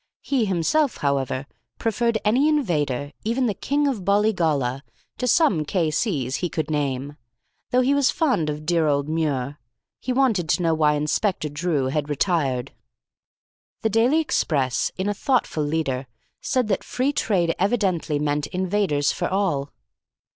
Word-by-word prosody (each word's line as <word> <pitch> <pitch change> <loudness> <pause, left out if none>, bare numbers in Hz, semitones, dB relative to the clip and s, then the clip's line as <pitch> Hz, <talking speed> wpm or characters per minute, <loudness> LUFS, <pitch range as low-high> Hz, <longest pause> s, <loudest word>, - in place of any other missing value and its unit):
He 265 -5 +1
himself, 205 - +1
however, 135 -2 -1 0.3
preferred 230 +1 0
any 255 +8 +3
invader, 150 - 0
even 235 +4 0
the 220 - +1
King 285 +9 0
of 240 -9 -2
Bollygolla, 165 - +1 0.4
to 250 - -1
some 250 - +3
K.C.'s 155 - -1
he 175 - -2
could 155 -1 -3
name, 140 -1 -2 0.5
though 250 - +3
he 265 +2 +2
was 285 -2 +3
fond 255 - +1
of 150 +1 -5
dear 165 -1 +2
old 140 -1 +1
Muir. 145 -3 -1 0.4
He 255 - -3
wanted 235 - +1
to 175 - +2
know 165 -1 +2
why 150 -1 +3
Inspector 150 +4 0
Drew 150 -2 -1
had 150 +1 -2
retired. 140 -5 0 1.1
The 220 - +2
Daily 240 +8 +3
Express, 140 - 0
in 190 +1 -1
a 205 - +1
thoughtful 245 - 0
leader, 145 -4 -2 0.3
said 255 -3 0
that 195 - 0
Free 265 +3 -1
Trade 175 -10 +1
evidently 190 -7 +1
meant 145 0 -1
invaders 185 -6 0
for - - -2
all. 175 -8 -1
170 Hz, 145 wpm, -23 LUFS, 145-225 Hz, 1.1 s, any